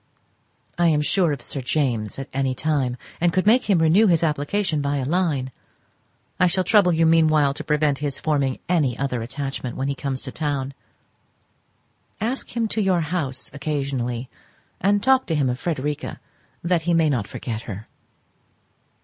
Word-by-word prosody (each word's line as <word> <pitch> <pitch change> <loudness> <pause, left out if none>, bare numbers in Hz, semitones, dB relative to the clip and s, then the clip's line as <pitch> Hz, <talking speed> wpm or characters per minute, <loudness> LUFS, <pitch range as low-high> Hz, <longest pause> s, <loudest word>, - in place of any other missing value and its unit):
I 175 - +4
am 150 -2 +3
sure 175 0 +2
of 140 -4 -4
Sir 135 - -4
James 125 -5 -1
at 135 - -5
any 135 -1 0
time, 135 -4 0 0.2
and 175 0 +3
could 185 +3 +1
make 230 +2 +4
him 195 - +5
renew 165 +7 +5
his 170 -3 +3
application 155 +2 0
by 140 0 0
a 135 - -2
line. 150 -5 0 0.9
I 180 - +5
shall 185 +2 +2
trouble 200 -2 +4
you 165 0 +3
meanwhile 155 -3 +4
to 155 - -7
prevent 150 -2 +1
his 145 -2 -2
forming 140 -4 0
any 150 -9 +1
other 135 -3 -2
attachment 130 0 -5
when 135 - -1
he - - 0
comes 135 -1 -4
to 130 - -6
town. 140 -3 -2 1.5
Ask 240 +3 -3
him 230 -1 +1
to 220 - 0
your 185 -3 +2
house 150 -6 -2
occasionally, 135 -4 -2 0.5
and 205 +1 +2
talk 260 0 +4
to 165 - 0
him 135 -4 +1
of 125 - -4
Frederica, 150 -3 -3 0.4
that 170 -1 +2
he 170 +1 +1
may 160 -2 +3
not 115 -7 -1
forget 115 -3 -5
her. 105 +1 -7
150 Hz, 170 wpm, -23 LUFS, 135-175 Hz, 1.5 s, him